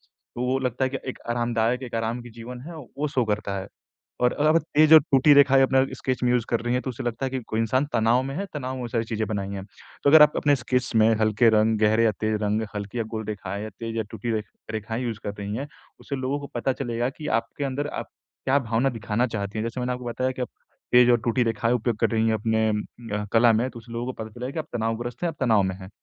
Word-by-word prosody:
तो 120 - -10
वो 130 +1 +1
लगता 125 0 -1
है 130 - +1
कि 135 - -3
एक - - -7
आरामदायक, 120 +1 0
एक 120 -2 -6
आराम 115 +2 -2
की 120 - -11
जीवन 120 +2 -9
है, 170 - -8
वो 150 0 -5
शो 130 -3 +1
करता 105 -2 -2
है। 95 - -7 0.6
और 125 - +4
अगर 150 +1 +1
आप 155 - +5 0.2
तेज 155 +1 +6
और 160 - +11
टूटी 135 +2 +6
रेखाएँ 135 -1 +6
अपना 130 0 +4
स्केच 130 -1 -2
में 125 - +3
यूज़ 120 -2 +2
कर 115 - +1
रही 120 +1 -1
हैं 125 - 0
तो 130 - -3
उसे 120 - -7
लगता 120 +2 -2
है - - -3
कि 130 - -2
कोई 110 - -1
इंसान 130 +5 +1
तनाव 115 +2 +3
में 135 +1 -5
है, 195 - -2
तनाव 130 -3 -3
में 130 - -6
वो 120 - -4
सारी 115 -1 -1
चीज़ें 110 -1 -2
बनाई 100 -2 -3
हैं। 100 -1 -5 0.4
तो 140 - +5
अगर 155 +1 +9
आप 150 0 +5
अपने 145 -1 +3
स्केच 125 0 -1
में 110 0 +6
हल्के 110 +2 +4
रंग, 110 0 +3
गहरे 110 +1 +4
या 110 - +5
तेज 110 0 0
रंग, 105 +1 +1
हल्की 105 +3 -5
या 115 - 0
गोल 110 0 -3
रेखाएँ 100 -1 -4
या 110 - -5
तेज 115 0 -4
या 110 - +1
टूटी 120 - -4
रेख 110 -1 -1 0.3
रेखाएँ 110 +2 -3
यूज़ 115 -3 -3
कर 100 - -2
रही 100 +1 -4
हैं, 135 +4 -4 0.3
उससे 140 - -5
लोगों 130 +2 -2
को 140 - -7
पता 125 +2 0
चलेगा 120 -2 -2
कि 155 - -7
आपके 115 +5 -7
अंदर 140 +2 -2
आप - - -8 0.4
क्या 135 +2 +3
भावना 120 0 0
दिखाना 115 +2 0
चाहती 100 -2 -4
हैं। 110 - -1
जैसे 115 +2 -4
मैंने 125 0 -1
आपको 125 0 -6
बताया 130 +2 -1
कि - - -1
आप 125 - -3 0.4
तेज 125 0 +7
और 120 - +5
टूटी 120 +2 +2
रेखाएँ 115 +1 +1
उपयोग 120 -1 0
कर - - +3
रही 110 0 +1
हैं 110 - +2
अपने 110 +1 +1
उम, 105 0 -1 0.3
अ, 105 0 -2
कला 115 0 +6
में 115 +3 +1
तो 120 - -10
उस 115 - -15
लोगों 115 +1 -4
को - - -6
पता 110 - -8
चले 125 +2 -4
कि 160 - -5
आप 155 - -3
तनावग्रस्त 115 +2 -3
हैं, 175 - +1
आप 160 - -13
तनाव 110 -6 +4
में 95 0 -1
हैं। 95 - -9
120 Hz, 275 wpm, -25 LUFS, 110-130 Hz, 0.6 s, और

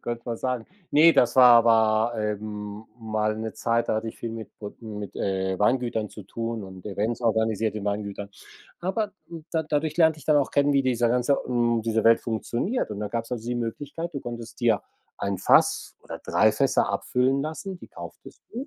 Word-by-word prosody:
Könnt 120 0 -4
man 115 - -2
sagen. 125 -2 -2 0.2
Ne, 160 +3 +7
das 120 +1 +3
war 125 -2 +9
aber, 110 0 +3
ähm, 105 0 -4
mal 110 -1 -1
'ne 110 0 -4
Zeit, 115 0 0
da 110 - +1
hatte 115 +1 -3
ich - - -8
viel 115 - -4
mit 115 -1 -8
brod 105 +2 -9
mit, 105 -3 -7
äh, 95 -1 -1
Weingütern 115 -1 +1
zu 105 - -10
tun 115 +2 -4
und 95 -1 -11
Events 105 +4 -2
organisiert 110 -2 +1
in 105 -2 -5
Weingütern. 100 0 -3 0.5
Aber, 200 +3 -1 0.2
hm, 165 -2 -9
da 160 -1 0
dadurch 155 +1 -1
lernte 160 -2 +4
ich 135 - -14
dann 150 - +4
auch 140 -2 +2
kennen, 145 0 +3
wie 140 -1 +3
dieser 120 -2 +1
ganze 125 +3 +2
hm, 120 -2 +1
diese 110 -1 0
Welt 115 0 +6
funktioniert. 120 - -2
Und 105 - -5
da 105 - -3
gab's 115 +2 -4
also 115 -1 -4
die 120 - -1
Möglichkeit, 145 +8 -4
du 140 - -3
konntest 120 +1 -8
dir 115 -3 +2 0.4
1 100 -2 -2
Fass - - +3
oder - - -8
3 110 - +4
Fässer 135 +3 +2
abfüllen 130 +2 +1
lassen, 175 +5 -5
die - - -13
kauftest - - -11
du. 255 +5 -5
115 Hz, 200 wpm, -25 LUFS, 110-135 Hz, 0.5 s, war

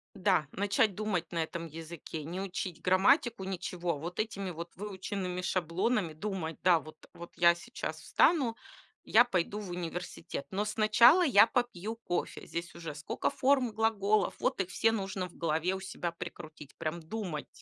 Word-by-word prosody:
Да, 185 -6 +2
начать 200 +1 +2
думать 185 -4 -2
на 170 - 0
этом 165 +1 -4
языке. 160 0 -7
Не 170 +5 -5
учить 185 -3 -4
грамматику, 195 - +3
ничего, 180 -2 -2
а - - -5
вот 170 +5 -6
этими 200 -4 -2
вот 170 +1 -6
выученными 190 -2 -4
шаблонами 180 +1 0
думать: 165 -2 -4
"Да, 175 -2 +5
вот 155 0 -14
вот 170 0 -10
я 170 0 +6
сейчас 240 +8 -6
встану, 270 -9 +3 0.5
я 235 - +6
пойду 200 -2 -1
в 200 -4 -6
университет. 175 -3 -5
Но 200 +2 -1
сначала 220 - +6
я 225 -7 +7
попью 225 -3 -2
кофе". 225 -6 -3
Здесь 170 0 -5
уже 165 -3 -6
сколько 145 0 -2
форм 265 -2 +3
и - - -9
глаголов, 215 -2 +2
вот - - +1
их 185 - -4
все 225 +3 +2
нужно 195 -3 -2
в 170 - -19
голове 165 +2 0
у 190 - -3
себя 180 -2 -4
прикрутить, 155 -3 -9
прям 165 +1 -3
думать. 170 -3 -5
185 Hz, 165 wpm, -31 LUFS, 170-210 Hz, 0.5 s, я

